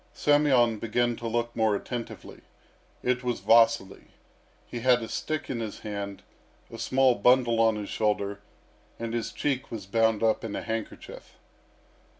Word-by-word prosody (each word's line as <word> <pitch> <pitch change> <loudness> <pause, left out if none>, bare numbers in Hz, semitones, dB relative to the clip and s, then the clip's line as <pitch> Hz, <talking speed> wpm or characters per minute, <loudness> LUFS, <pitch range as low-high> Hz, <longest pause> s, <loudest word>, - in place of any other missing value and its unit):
Semyon 135 -7 +3
began 120 +2 0
to 115 - -5
look 120 +1 -2
more 110 -2 +2
attentively. 120 +3 -7 0.6
It 125 0 0
was 125 -1 -1
Vasily. 115 -4 +3 0.6
He 120 - -6
had 125 0 +3
a - - -5
stick 155 +5 -3
in 125 - -3
his 110 -2 -6
hand, 100 -2 -6 0.5
a - - -9
small 130 -1 +3
bundle 120 +1 +3
on 110 -1 +4
his 105 -1 -5
shoulder, 100 -2 -1 0.6
and 115 0 -5
his 115 -1 -2
cheek 135 -3 -2
was 110 -4 -6
bound 110 +1 +1
up 110 -1 +2
in 105 -3 -4
a - - -4
handkerchief. 110 -1 -6
115 Hz, 155 wpm, -27 LUFS, 110-125 Hz, 0.6 s, on